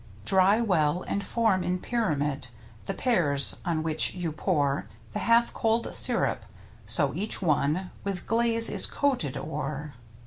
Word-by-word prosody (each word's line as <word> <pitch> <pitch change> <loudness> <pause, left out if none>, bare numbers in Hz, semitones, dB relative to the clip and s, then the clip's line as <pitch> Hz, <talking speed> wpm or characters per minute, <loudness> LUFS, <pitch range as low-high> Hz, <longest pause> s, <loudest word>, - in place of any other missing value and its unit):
Dry 195 - +4
well, 175 -5 0
and 200 - -3
form 210 -3 0
in 180 0 -1
pyramid 150 - -2 0.4
The - - -4
pears, 155 - +2
on 165 -3 -2
which 160 +1 +3
you 175 -3 -3
pour 150 -3 -1 0.3
The 210 - -3
half 235 +1 +2
cold 225 +1 -1
sirup, 140 - +1 0.4
so 135 +5 +3
each 200 +7 0
one 160 +1 -1
With 195 -2 -3
glaze 230 0 +2
is - - +5
coated 255 - -1
o'er. 150 -1 -5
180 Hz, 140 wpm, -26 LUFS, 150-225 Hz, 0.4 s, is